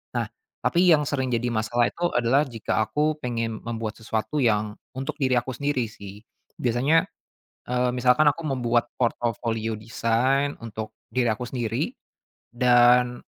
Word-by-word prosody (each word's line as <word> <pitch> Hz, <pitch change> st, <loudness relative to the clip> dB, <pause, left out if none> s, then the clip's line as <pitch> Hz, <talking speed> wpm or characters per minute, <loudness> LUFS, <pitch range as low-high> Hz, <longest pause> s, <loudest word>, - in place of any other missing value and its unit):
Nah, -, -, -1 dB, 0.3 s
tapi 180 Hz, +1 st, +3 dB
yang 150 Hz, -3 st, +5 dB
sering 130 Hz, -2 st, -1 dB
jadi 120 Hz, +1 st, 0 dB
masalah 120 Hz, +2 st, +1 dB
itu 175 Hz, -, -3 dB
adalah 120 Hz, +5 st, +3 dB
jika 115 Hz, -4 st, -2 dB
aku 150 Hz, +3 st, 0 dB
pengen 115 Hz, -4 st, -3 dB
membuat 115 Hz, -2 st, -4 dB
sesuatu 110 Hz, +6 st, -3 dB
yang 105 Hz, -3 st, +1 dB, 0.2 s
untuk 135 Hz, +3 st, -4 dB
diri 130 Hz, -2 st, +2 dB
aku 130 Hz, -, -1 dB
sendiri 140 Hz, -1 st, -1 dB
sih. 100 Hz, -1 st, -11 dB, 0.4 s
Biasanya, 130 Hz, +7 st, +2 dB, 0.7 s
eee, 125 Hz, 0 st, +1 dB
misalkan 125 Hz, +4 st, +4 dB
aku 165 Hz, -, -6 dB
membuat 120 Hz, -3 st, +1 dB
portofolio 115 Hz, -2 st, -1 dB
desain 115 Hz, +6 st, 0 dB
untuk 110 Hz, -1 st, -6 dB, 0.2 s
diri 125 Hz, -1 st, +1 dB
aku 110 Hz, +3 st, -2 dB
sendiri 115 Hz, -3 st, -2 dB, 0.6 s
dan 125 Hz, 0 st, +5 dB
120 Hz, 140 wpm, -25 LUFS, 115-135 Hz, 0.7 s, yang